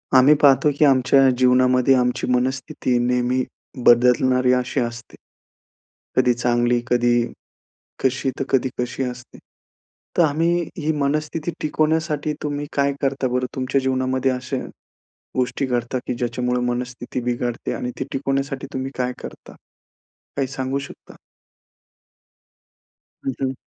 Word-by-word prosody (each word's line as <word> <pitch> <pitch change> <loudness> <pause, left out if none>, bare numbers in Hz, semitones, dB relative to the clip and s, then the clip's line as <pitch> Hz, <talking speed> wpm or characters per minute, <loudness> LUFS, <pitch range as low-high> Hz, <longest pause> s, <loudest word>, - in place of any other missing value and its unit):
आम्ही 130 +4 +7
पाहतो 140 +1 +5
की 150 - +5
आमच्या 135 0 +5
जीवनामध्ये 125 +1 +4
आमची 125 -1 0
मनस्थिती 125 0 0
नेहमी 125 +1 +1 0.4
बदलणारी 125 +1 +5
अशी 125 +2 0
असते. 120 -1 -5 1.0
कधी 125 -1 +4
चांगली, 120 0 +1
कधी 120 -1 +2 0.8
कशी, 135 0 +1
तर - - +1
कधी 130 -1 +2
कशी 125 +2 -2
असते. 125 -1 -7 0.8
तर 175 - +6
आम्ही 165 +3 +2 0.2
ही 155 -2 0
मनस्थिती 155 +3 -1
टिकवण्यासाठी 155 0 0
तुम्ही 145 -1 -2
काय 140 0 +1
करता 135 -1 0
बरं? 125 +1 0
तुमच्या 130 0 0
जीवनामध्ये 130 0 0
अशा 130 +1 -3 0.8
गोष्टी 130 +2 0
घडतात 125 0 -1
की 125 - -1
ज्याच्यामुळे 125 +1 -1
मनस्थिती 125 0 -5
बिघडते 120 0 -2
आणि 125 - -3
ती - - -2
टिकवण्यासाठी 135 0 -2
तुम्ही 130 0 -3
काय 125 0 0
करता? - - -10 0.8
काही 135 - 0
सांगू 135 0 -2
शकता? 140 0 -11 2.1
हं, 135 - -1
हं. 130 -1 0
130 Hz, 120 wpm, -22 LUFS, 125-135 Hz, 2.1 s, आम्ही